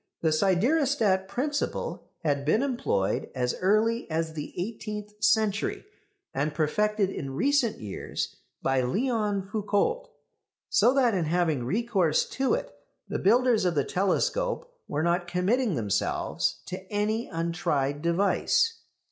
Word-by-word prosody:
The 160 - +3
siderostat 200 - +2
principle 285 +9 -3
had 145 -3 +1
been 210 - +2
employed 130 - 0
as 125 -1 0
early 215 +4 +2
as 160 0 -1
the 150 -2 -6
eighteenth 210 +1 -5
century, 215 - +2 0.5
and 150 +2 -1
perfected 205 +6 +1
in 135 -6 -5
recent 270 - +2
years 105 -3 -5 0.3
by 135 -1 +2
Léon 205 - 0
Foucault, 215 - 0 0.6
so 245 - +5
that 250 -4 +4
in 180 -4 0
having 160 -5 +1
recourse 190 - +1
to 270 - +1
it - - -5 0.4
the - - -3
builders 240 +1 +4
of 180 -2 +1
the 140 - +2
telescope - - 0
were 150 - -1
not 175 +1 +1
committing 195 +4 +1
themselves 85 - -1
to 185 - -5
any 215 +3 0
untried 150 -4 -1
device. 195 - +2
195 Hz, 125 wpm, -27 LUFS, 160-235 Hz, 0.6 s, so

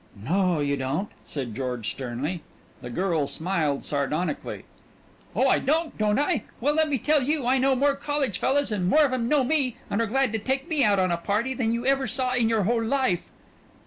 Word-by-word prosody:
"No, 175 - +1
you 140 0 0
don't!" 140 +10 -2 0.2
said 130 -6 -4
George 125 -3 -3
sternly. 135 +7 -4 0.4
The 125 - -8
girl 165 0 0
smiled 160 -5 -1
sardonically. 150 - -2 0.7
"Oh, - - +3
I - - +4
don't, 315 +3 0
don't 210 -1 +1
I? 295 - 0
Well, 290 +5 +1
let 315 0 +2
me 280 - +1
tell 295 +5 +2
you 290 0 0
I 260 +2 +3
know 265 +1 +3
more 280 +2 +2
college 280 -7 -1
fellas 280 -1 +1
and 185 -4 0
more 305 +5 +5
of 265 - -1
'em 240 -2 -1
know 295 -3 +3
me, 265 -3 0
and 205 - +1
are 230 - 0
glad 265 +1 +1
to 225 - 0
take 265 +6 -2
me 310 -5 +1
out 205 -3 +4
on 185 -1 +2
a 170 - +1
party, 210 +9 -1
than 235 -3 0
you 235 +1 -2
ever 270 0 +2
saw 255 +2 -1
in 240 -3 +2
your 220 -3 +2
whole 230 +3 +1
life." 245 -7 0
230 Hz, 210 wpm, -25 LUFS, 175-270 Hz, 0.7 s, more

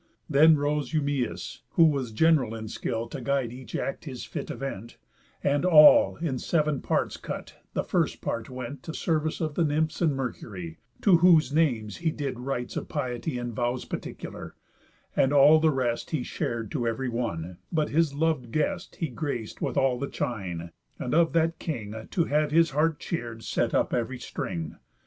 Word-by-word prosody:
Then 155 +2 +6
rose 145 +1 -1
Eumæus 145 -4 -1
(who 165 - +6
was 140 -6 +1
general 130 -3 +3
In 110 -1 -6
skill 115 +1 -3
to 130 - -6
guide 130 -2 0
each 130 0 -9
act 135 - -3
his 130 -5 -6
fit - - -6
event) 115 -3 -6 0.5
And, 145 +2 +2
all 155 -4 +8
in 145 -7 -2
seven 150 -2 0
parts - - 0
cut, - - -7 0.2
the - - +1
first - - 0
part 115 -1 -3
went 130 +1 -6
To 160 - -7
service 155 -1 -1
of 155 -2 -1
the 170 - +1
Nymphs 155 +2 0
and 160 -4 +3
Mercury, 100 -10 -5 0.2
To 190 -5 +6
whose 165 -5 +5
names 120 -10 +1
he 170 -1 0
did 140 -5 -4
rites 125 -1 -3
of - - -4
piety 130 0 -3
In 120 -1 -4
vows 120 +2 -1
particular; - - -7 0.6
and 135 - +3
all 145 +2 +7
the 160 0 +4
rest 125 -5 -1
He 150 -6 -1
shar'd 115 -2 -3
to 125 -7 -1
ev'ry 115 +3 -1
one, 90 -8 -3
but 155 -2 +1
his 160 0 +2
lov'd 150 -6 0
guest 170 +6 -1
He 165 - -2
grac'd 130 -5 -4
with - - -2
all 130 -2 +2
the 140 - -3
chine, 90 -7 -4 0.3
and 125 - -3
of 165 +1 +4
that 165 0 +1
king, 110 -8 -5
To 170 - +1
have 150 0 +1
his 165 +1 +4
heart 150 +2 +1
cheer'd, 115 -8 -5
set - - 0
up - - +1
ev'ry 125 +2 -1
string. 85 -9 -5
135 Hz, 180 wpm, -27 LUFS, 120-155 Hz, 0.6 s, all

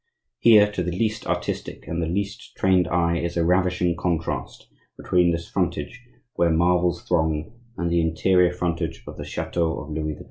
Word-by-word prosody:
Here, 105 -3 +6
to 100 - -3
the 90 - -1
least 110 +4 -2
artistic - - -3
and 85 +1 -2
the 80 - -1
least 100 +5 -4
trained 95 -2 +3
eye, 85 0 +1
is 85 0 -3
a 85 - +2
ravishing 90 -1 +2
contrast 85 -1 -3 0.3
between 90 -1 +2
this 85 0 -3
frontage, 115 - -2 0.3
where 85 - +2
marvels 90 +2 +2
throng, 80 +1 0 0.2
and 85 -1 -1
the 85 0 +3
interior 90 +2 +3
frontage 85 -6 -3
of - - -9
the - - -6
chateau 85 -2 -2
of 70 - -9
Louis 75 0 -3
XII. - - -16
85 Hz, 175 wpm, -24 LUFS, 85-90 Hz, 0.3 s, Here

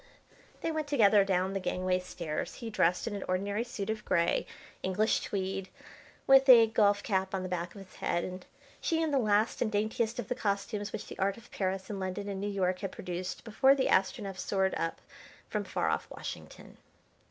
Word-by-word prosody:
They 330 - -1
went 310 -2 -2
together 210 -8 +5
down 190 0 0
the 195 - -1
gangway 185 0 0
stairs, 170 -4 -5
he 230 -3 -6
dressed 180 -3 +2
in 225 -3 -3
an 200 - -4
ordinary 200 +4 0
suit 220 -5 -5
of 220 -1 -5
grey, 170 -1 +1 0.3
English 205 +4 +1
tweed, 195 -1 -3 0.6
with 270 0 +6
a 235 -3 +10
golf 205 -2 +3
cap 190 -2 0
on 185 - -2
the - - -3
back 175 0 -4
of 195 -1 -9
his 185 - -19
head, 175 - 0
and 185 0 -6 0.4
she 325 - +1
in 320 -2 +1
the 275 - +3
last 215 -1 +2
and 220 - +1
daintiest 220 +2 0
of 240 -5 -4
the - - 0
costumes 205 -2 -2
which 220 - -5
the - - -10
art 195 +1 +1
of 230 - -16
Paris 190 -1 -2
and 205 -2 -5
London 190 +2 -3
and 195 -1 -4
New 205 - -2
York 185 -2 0
had 195 -2 -4
produced 180 0 -5
before 265 +5 +4
the 265 -2 +1
Astronef 195 0 +1
soared 190 -1 0
up 165 - -2 0.5
from - - -1
far - - -1
off - - -1
Washington. - - -9
200 Hz, 200 wpm, -31 LUFS, 185-220 Hz, 0.6 s, a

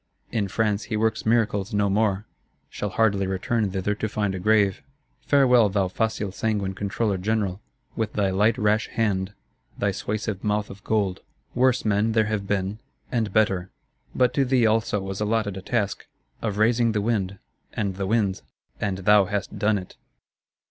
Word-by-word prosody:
In 105 -3 0
France 105 +1 0
he 110 - -2
works 110 0 0
miracles 110 -2 +1
no 100 0 +2
more; 100 0 +1 0.5
shall 105 - -3
hardly 100 -1 +2
return 100 +3 0
thither 95 +2 -1
to 110 +1 -3
find 105 -2 -1
a 95 - -4
grave. 100 -1 +3 0.5
Farewell, 125 -6 +5
thou 95 -1 0
facile 105 0 -1
sanguine 100 -2 -1
Controller 100 0 -1
General, 100 -1 -1 0.3
with 110 -2 -2
thy 100 -2 +1
light 105 +4 +2
rash 105 +2 +2
hand, 100 -3 -1 0.4
thy 100 - +1
suasive 105 0 -3
mouth 105 0 0
of 100 0 -12
gold: 100 -4 0 0.3
worse 125 -1 +2
men 105 +1 +2
there 110 -1 +3
have 105 -2 -2
been, 100 +1 -1 0.3
and 115 -5 0
better; 95 -4 +1 0.5
but 125 -1 +3
to 140 - +2
thee 130 -2 +3
also 110 -1 +2
was 95 +1 -5
allotted 105 -2 0
a 95 - -6
task,—of 105 0 -4
raising 115 +1 +3
the 105 - 0
wind, 100 -3 -1 0.4
and 100 -3 -2
the 100 -1 -2
winds; 105 -3 +1 0.4
and 100 -2 -1
thou 105 -1 +6
hast 100 +1 -4
done 105 0 +2
it. 90 -2 -9
105 Hz, 165 wpm, -24 LUFS, 100-110 Hz, 0.5 s, thou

